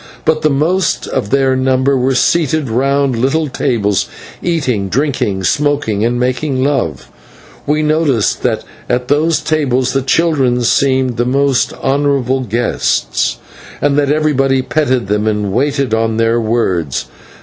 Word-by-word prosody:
But 155 0 +1
the 155 - +2
most 165 +7 0
of 100 - -3
their 135 0 +2
number 130 +1 +1
were 130 +1 +1
seated 155 -2 +1
round 135 +2 +1
little 135 +7 0
tables 110 -7 0 0.3
eating, 130 - -1
drinking, 120 -7 -1
smoking, 145 -3 0
and 120 +1 0
making 130 +2 -1
love, 130 - -2 0.6
and - - +2
we 155 - 0
noticed 150 -7 +1
that - - -1 0.3
at 125 0 -1
these 155 +3 +2
tables 130 -5 0
the 135 - +1
children 135 -4 +1
seemed 130 0 +1
the 120 - +1
most 135 -1 +1
honourable 135 -2 0
guests, 120 0 -1 0.4
and 145 -1 +1
that 145 -1 +2
everybody 135 -3 +1
petted 130 -5 0
them 105 +1 0
and 105 -2 -1
waited 135 0 0
on 110 0 0
their 115 +1 +2
words. 95 - -1
130 Hz, 140 wpm, -14 LUFS, 120-145 Hz, 0.6 s, the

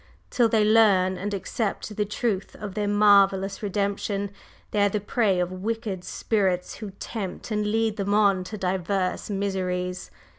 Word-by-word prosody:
Till 235 -2 +3
they 215 -1 +3
learn 205 -4 +4
and 205 +3 -3
accept 205 +1 -3
the 210 - 0
truth 205 -1 -2
of 205 -2 -6
their 210 0 -1
marvellous 200 -1 +4
Redemption, 200 0 -2 0.4
they 210 - +1
are 205 - +4
the 210 - -1
prey 205 -2 +1
of 180 0 -1
wicked 200 0 -3
spirits 190 -5 -1
who 215 - -6
tempt 205 0 -6
and 210 -1 0
lead 220 0 0
them 200 0 0
on 200 -3 +3
to 215 +4 -6
divers 185 0 -1
miseries. 185 -2 -2
200 Hz, 155 wpm, -25 LUFS, 190-210 Hz, 0.4 s, learn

